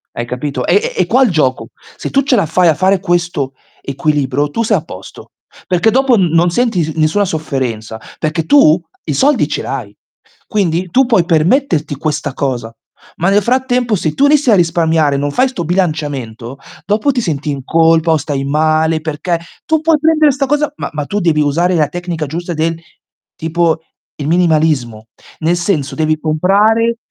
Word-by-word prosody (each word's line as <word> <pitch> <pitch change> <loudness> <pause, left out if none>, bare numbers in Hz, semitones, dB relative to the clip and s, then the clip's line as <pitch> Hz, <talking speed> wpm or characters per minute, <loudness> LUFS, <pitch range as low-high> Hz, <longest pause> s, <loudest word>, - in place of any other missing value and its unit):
Hai 120 - -3
capito? 125 +1 -4
È 195 - +3
è - - -4
è 185 - 0
qua 255 +8 +4
il 240 - +2
gioco: 130 -8 0 0.3
se - - -5
tu 275 - +3
ce 275 -1 +1
la 200 - +2
fai 170 +3 +2
a 160 - +4
fare 190 +2 +2
questo 175 -7 -1 0.3
equilibrio 145 0 -1
tu 230 - -2
sei 215 -2 +2
a 155 - -5
posto, 95 - -12 0.4
perché 185 +5 +2
dopo 265 +1 +3
n 195 -4 +3
non 170 +1 +3
senti 230 -5 +1
sn 160 +1 -5
nessuna 155 +7 +2
sofferenza, 130 - -4 0.2
perché 155 +1 -2
tu 185 - +5 0.3
i 150 - -2
soldi 265 - +2
ce 150 - -3
l'hai. 115 -7 -5 0.5
Quindi 180 -3 -1
tu 265 +6 +4
puoi 215 -8 +3
permetterti 165 - +1
questa 145 -1 -3
cosa, 125 -5 -3 0.5
ma 175 - +1
nel 200 +1 +3
frattempo 245 0 0
se 160 -5 -2
tu 280 - +2
inizi 285 -3 +3
a - - +6
risparmiare, 165 -4 +2
non 145 +1 -2
fai 255 - +2
'sto 255 -10 -5
bilanciamento, 145 - -3 0.3
dopo 210 +8 +1
ti 260 - -1
senti 150 -6 -3
in 140 -2 -4
colpa, 165 +2 +3
o 160 - +3
stai 145 -2 -3
male, 155 +2 +1
perché 160 +2 -2 0.3
tu 315 -1 +1
puoi 320 0 +3
prendere 310 -1 +3
'sta 275 +1 -1
cosa, 295 +2 0
ma - - -5
ma 150 -2 -3
tu 205 - -2
devi 160 -4 +2
usare 165 +5 +1
la 155 -4 +2
tecnica 170 -1 -5
giusta 170 +4 -5
del 165 +1 -1 0.6
tipo, 165 0 0 0.4
il 145 - -4
minimalismo. 155 -10 +1 0.3
Nel 170 +2 +1
senso, 175 -6 -1
devi 155 0 0
comprare 205 +9 +2
165 Hz, 185 wpm, -14 LUFS, 150-205 Hz, 0.6 s, a